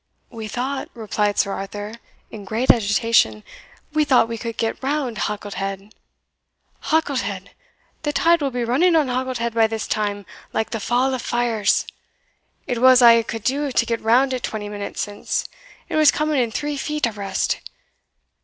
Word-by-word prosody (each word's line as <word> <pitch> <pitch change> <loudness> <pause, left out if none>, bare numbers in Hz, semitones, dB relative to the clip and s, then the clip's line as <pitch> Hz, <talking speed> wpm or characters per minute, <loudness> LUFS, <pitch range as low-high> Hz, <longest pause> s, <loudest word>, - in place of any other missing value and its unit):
"We 225 -3 -6
thought," 260 +5 -3
replied 210 -2 -1
Sir 200 - +2
Arthur, 205 +2 -6 0.4
in 215 -2 -8
great 220 +6 +3
agitation, 205 - +2 0.5
"we 305 0 +3
thought 255 -5 +4
we 230 -1 -5
could 230 -1 -5
get 225 0 -2
round 270 -4 -1
Halket 205 -1 -3
head." 195 +1 -5 0.9
"Halket 305 -4 +1
head! 195 -2 -6 0.5
the 295 - -1
tide 335 +3 +3
will 280 - +1
be 245 -2 -2
running 330 +9 +3
on 300 -5 +3
Halket 255 0 -2
head 235 0 -2
by 225 -1 +4
this 220 0 -4
time 205 -1 -2 0.3
like 220 - -1
the 225 - -2
Fall 245 +5 +1
of 255 - -2
Fyers! 235 -4 +1 0.8
it 240 -1 -2
was 255 -1 +7
a' 230 -1 +8
I - - +1
could 225 -1 -6
do 280 +3 0
to - - +2
get 230 -1 -2
round 255 +4 +3
it 255 - -2
twenty 210 -3 -4
minutes 205 -1 -5
since 205 -1 -3 0.4
it - - -4
was 310 -2 +7
coming 305 -2 +1
in 235 - 0
three 295 +5 -3
feet 300 +1 -1
abreast. 205 -4 -2
230 Hz, 175 wpm, -22 LUFS, 210-265 Hz, 0.9 s, a